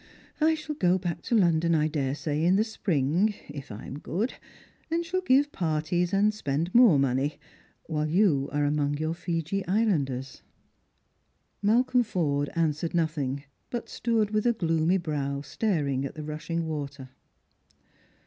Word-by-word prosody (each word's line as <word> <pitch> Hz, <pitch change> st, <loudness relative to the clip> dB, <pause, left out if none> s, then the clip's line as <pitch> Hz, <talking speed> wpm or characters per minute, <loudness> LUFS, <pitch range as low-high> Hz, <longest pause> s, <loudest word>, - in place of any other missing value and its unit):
I 315 Hz, +1 st, +4 dB
shall 305 Hz, 0 st, -5 dB
go 185 Hz, -10 st, +2 dB
back 175 Hz, -3 st, -3 dB
to 235 Hz, -, +1 dB
London, 170 Hz, -4 st, +3 dB
I 155 Hz, 0 st, +2 dB
daresay, 150 Hz, +1 st, -2 dB
in 180 Hz, +3 st, +4 dB
the 210 Hz, -, +4 dB
spring, 190 Hz, -, 0 dB
if 145 Hz, -4 st, -8 dB
I 105 Hz, -, -8 dB
am 140 Hz, -, -7 dB
good, 200 Hz, +12 st, -2 dB, 0.6 s
and 335 Hz, +1 st, 0 dB
shall 370 Hz, +2 st, -1 dB
give 285 Hz, -3 st, +3 dB
parties, 170 Hz, +1 st, 0 dB
and 205 Hz, +2 st, +3 dB
spend 165 Hz, -2 st, -2 dB
more 235 Hz, -, +7 dB
money, 135 Hz, +2 st, +1 dB, 0.5 s
while 155 Hz, -1 st, -1 dB
you 155 Hz, -6 st, +3 dB
are 145 Hz, 0 st, +1 dB
among 145 Hz, 0 st, 0 dB
your 155 Hz, +2 st, -1 dB
Fiji 170 Hz, +2 st, -2 dB
islanders." 150 Hz, -, 0 dB, 1.2 s
Malcolm 245 Hz, +4 st, +3 dB
Forde 150 Hz, -10 st, 0 dB
answered 165 Hz, 0 st, 0 dB
nothing, 145 Hz, -5 st, -1 dB, 0.3 s
but 240 Hz, -, -4 dB
stood 225 Hz, -3 st, 0 dB
with 215 Hz, +2 st, +1 dB
a 240 Hz, -, +4 dB
gloomy 165 Hz, -2 st, +1 dB
brow 145 Hz, -5 st, -2 dB
staring 145 Hz, -5 st, -1 dB
at 140 Hz, -, -5 dB
the 155 Hz, -, -6 dB
rushing 160 Hz, +2 st, -3 dB
water. 140 Hz, -4 st, -5 dB
165 Hz, 150 wpm, -27 LUFS, 145-205 Hz, 1.2 s, more